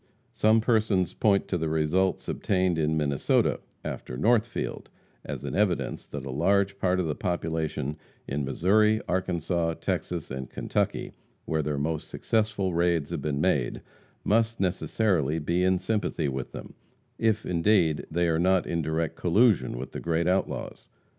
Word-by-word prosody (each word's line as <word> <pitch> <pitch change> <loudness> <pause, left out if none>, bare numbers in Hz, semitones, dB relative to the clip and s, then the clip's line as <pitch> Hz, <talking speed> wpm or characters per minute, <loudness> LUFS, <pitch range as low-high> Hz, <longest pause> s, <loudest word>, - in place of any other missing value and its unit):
Some 110 +1 +4
persons 110 -6 +2
point 100 -3 +2
to 90 - 0
the 80 0 -1
results 80 +5 +1
obtained 90 -3 0
in 80 0 +1
Minnesota, 70 -3 +1 0.3
after 60 - -5
Northfield, 115 - 0 0.3
as - - -6
an - - -4
evidence 100 -4 0
that 70 -2 -6
a 65 - -4
large 100 +7 +1
part 95 -1 +1
of 90 - 0
the 75 - -1
population 80 -4 -2 0.3
in 70 +1 -2
Missouri, 105 +10 +3
Arkansas, 85 -2 0
Texas 85 -3 -3
and 65 -1 -5
Kentucky, - - -2 0.3
where 80 -1 0
their 75 -1 -2
most 80 +2 -2
successful 105 -4 0
raids 85 -3 +1
have - - -3
been 75 -2 -2
made, 75 -10 +1 0.4
must 115 +2 +2
necessarily 90 -4 +1
be 85 +3 0
in 95 0 +3
sympathy 95 -5 -1
with 65 -1 -4
them, - - -9 0.5
if, 110 -1 +1
indeed, 85 -3 +2
they 85 +2 +1
are 80 -1 +1
not 95 +1 +3
in 85 - -1
direct 80 +1 -1
collusion 100 - +3
with 65 +1 -6
the - - -5
great 85 0 0
outlaws. 95 +2 -2
85 Hz, 155 wpm, -27 LUFS, 80-100 Hz, 0.5 s, Some